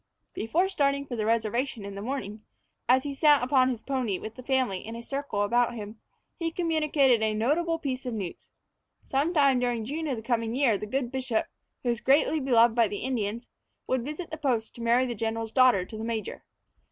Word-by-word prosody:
Before 330 - +1
starting 280 -6 0
for 250 - -5
the 215 -2 -1
reservation 230 0 0
in 200 - -6
the 200 - -6
morning, 215 -3 -4 0.5
as 260 +1 +5
he 285 - -4
sat 290 -1 +4
upon 255 0 +3
his 235 -3 -4
pony 255 -8 -1
with 220 - -7
the 255 - -10
family 255 -7 0
in 225 +4 -8
a 235 - -7
circle 275 -6 -2
about 240 +3 +2
him, 215 0 -8 0.4
he 330 -1 0
communicated 305 -7 +2
a 215 -1 +1
notable 320 +9 +1
piece 265 -4 -4
of 240 - -3
news. 190 -5 -6 0.5
Some 280 +5 0
time 280 -6 +4
during 240 -3 -1
June 310 +6 -3
of 270 - -1
the 220 - -7
coming 230 -1 -1
year 260 -5 +3
the 210 +1 -5
good 250 +1 -2
bishop, 255 -4 -1 0.4
who 245 - 0
was 235 -1 -1
greatly 295 +3 +3
beloved 240 -4 +4
by 230 -1 +3
the 205 - -5
Indians, 235 -2 -2 0.4
would 260 -1 0
visit 305 +6 -6
the 315 - -4
post 250 -7 -1
to 235 - -10
marry 235 +2 +3
the 245 - -3
general's 225 0 -3
daughter 250 -8 +4
to 215 - -9
the - - -4
major. 225 -1 -4
245 Hz, 210 wpm, -27 LUFS, 225-275 Hz, 0.5 s, as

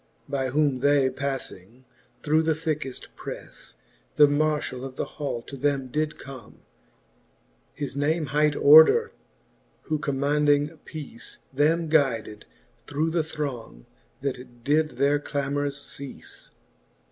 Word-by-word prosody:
By 135 -2 -1
whom 140 -1 +2
they 140 -1 +3
pafling 130 -4 -5 0.4
through 155 +1 +3
the 160 -1 +1
thickeft 155 -5 -3
preafle, - - -8 0.4
The 150 - +8
marfhall 145 -3 0
of 135 -1 -7
the - - -2
hall 140 -6 -4
to 140 - -9
them 135 -1 0
did 155 +3 -1
come; 135 -3 -11 1.1
His 140 -2 -4
name 155 +3 +1
hight 150 0 +3
Order, 160 - +7 0.7
who 155 -1 -1
commaunding 145 +2 +1
peace, 145 -7 -8 0.2
Them 160 +4 +2
guyded 130 -9 +1 0.4
through 150 +3 0
the 165 -1 +1
throng, 130 - -5 0.4
that 125 -3 -5
did 155 +3 +1
their 145 +1 +3
clamors 145 0 -2
ceafle. 140 -1 -9
145 Hz, 120 wpm, -26 LUFS, 135-150 Hz, 1.1 s, The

